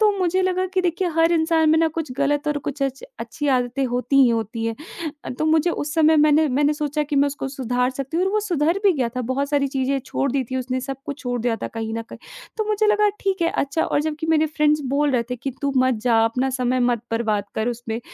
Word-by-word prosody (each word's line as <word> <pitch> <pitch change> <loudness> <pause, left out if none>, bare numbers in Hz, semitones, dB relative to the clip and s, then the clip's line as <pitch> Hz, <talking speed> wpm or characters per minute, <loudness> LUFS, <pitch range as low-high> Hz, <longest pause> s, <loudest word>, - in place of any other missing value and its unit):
तो 430 -1 +5
मुझे 370 +1 +1
लगा 370 0 0
कि 370 - +3
देखिए 355 +1 0
हर 330 +1 +4
इंसान 320 -1 +3
में 320 - +4
ना 325 0 +3
कुछ 305 -5 -3
गलत 290 +1 +1
और 295 - 0
कुछ 280 0 -3
अच्छ 270 -1 -2 0.2
अच्छी 295 -3 -4
आदतें 250 +2 -1
होती 250 +2 -1
ही 255 - +5
होती 225 0 -2
हैं 225 - -2 0.5
अ, - - -5
तो 255 +5 -3
मुझे 315 +2 +3
उस 295 -3 -3
समय 315 -1 +4
मैंने 305 0 +4
मैंने 295 0 +3
सोचा 300 0 -1
कि 290 -1 -3
मैं 280 - +4
उसको 280 -1 -4
सुधार 250 -2 -1
सकती 275 +4 -5
हूँ 360 - +2
और - - 0
वो 425 - +2
सुधर 345 -2 0
भी 390 - +6
गया 260 -6 -1
था, - - 0
बहुत 260 +3 -1
सारी 280 -2 +1
चीज़ें 270 0 0
छोड़ 275 -1 -1
दी 270 -1 0
थीं 260 - -2
उसने, 255 0 -2
सब 270 +1 -5
कुछ 285 0 -5
छोड़ 245 -2 -2
दिया 230 -1 0
था - - -2
कहीं 225 0 -3
न 230 - -3
कहीं, - - -12 0.4
तो 435 - -1
मुझे 430 0 +2
लगा 420 0 +4
ठीक 385 -3 -1
है, 335 - +3
अच्छा 280 0 -1
और - - 0
जबकि 315 +1 -3
मेरे 315 -1 +3
फ्रेंड्स 300 -1 +2
बोल 290 +2 +1
रहे 245 -2 +2
थे 250 - -2
कि 260 +3 -4
"तू 280 0 0
मत 255 0 +3
जा, 240 -2 +3
अपना 250 +4 0
समय 255 -1 0
मत 240 -2 +1
बर्बाद 220 -3 0
कर 220 +2 -1
उसमें," 235 -1 -4
280 Hz, 260 wpm, -22 LUFS, 250-320 Hz, 0.5 s, भी